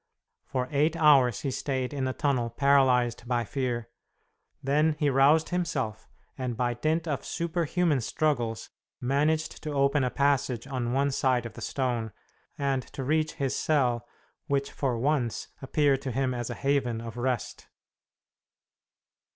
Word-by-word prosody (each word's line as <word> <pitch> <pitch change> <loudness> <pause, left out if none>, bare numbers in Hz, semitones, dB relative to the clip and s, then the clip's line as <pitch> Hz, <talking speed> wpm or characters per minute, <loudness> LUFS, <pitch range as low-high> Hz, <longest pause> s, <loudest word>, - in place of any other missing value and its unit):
For 125 -1 -2
eight 150 +3 +2
hours 140 -9 +5
he 135 - -2
stayed 130 0 -2
in 135 -2 -1
the 130 - 0
tunnel 130 -6 0
paralyzed 125 -2 +3
by 120 -1 +1
fear. 120 -1 -3 0.7
Then 150 +3 +2
he 150 -2 +2
roused 145 +4 +4
himself, 110 -12 -2 0.3
and 125 -3 -3
by 120 -1 +1
dint 155 +7 -1
of 145 -4 -2
superhuman 170 -3 0
struggles 120 -4 -1 0.3
managed 150 +5 0
to 150 -2 -4
open 140 0 +2
a 125 - +1
passage 135 -4 +1
on 125 -3 -3
one 140 +1 +2
side 130 -3 +1
of 115 - -7
the - - -10
stone, 120 -5 -2 0.4
and 135 -2 0
to 135 - -4
reach 155 +3 +1
his 135 -1 -2
cell, 125 -6 +1 0.4
which 140 -2 0
for 130 -4 -1
once 130 -2 -1
appeared 140 0 +2
to 135 - -3
him 130 +1 0
as 120 -2 -4
a - - -4
haven 135 -5 0
of 115 0 -7
rest. 120 -2 -3
135 Hz, 150 wpm, -28 LUFS, 120-145 Hz, 0.7 s, hours